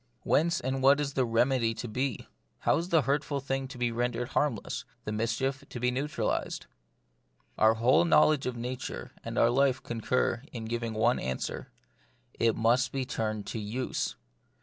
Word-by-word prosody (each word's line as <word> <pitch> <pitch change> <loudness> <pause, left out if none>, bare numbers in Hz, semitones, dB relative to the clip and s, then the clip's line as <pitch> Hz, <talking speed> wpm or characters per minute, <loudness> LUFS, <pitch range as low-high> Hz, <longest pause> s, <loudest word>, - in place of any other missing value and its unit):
Whence 170 +2 +2
and 130 +1 -2
what 140 +2 +6
is 145 -1 -2
the 130 -3 +1
remedy 115 0 +2
to 120 - -5
be? 125 +2 -2 0.4
How - - +3
is 170 +2 -4
the 165 -5 +4
hurtful 140 +1 0
thing 135 0 -2
to 130 - -10
be 120 -1 0
rendered 120 +1 -1
harmless, 140 -8 -1 0.2
the - - -2
mischief 115 +5 -1
to 125 - -6
be 125 +1 +1
neu 135 +4 -1
tralised? 150 - -2 0.9
Our 110 +1 +5
whole 120 +8 +4
knowledge 155 -4 +4
of 125 -1 -3
nature 125 +2 -5
and - - -5
of 120 +1 +4
life 135 -1 +2
concur 120 +1 0
in 115 -3 -6
giving 115 0 -3
one 110 - +3
answer: 65 0 -4 0.6
it 115 -1 +2
must 120 +3 +2
be 135 -1 -2
turned 110 -3 -2
to 115 - -3
use. 110 +5 -2
125 Hz, 170 wpm, -29 LUFS, 115-135 Hz, 0.9 s, what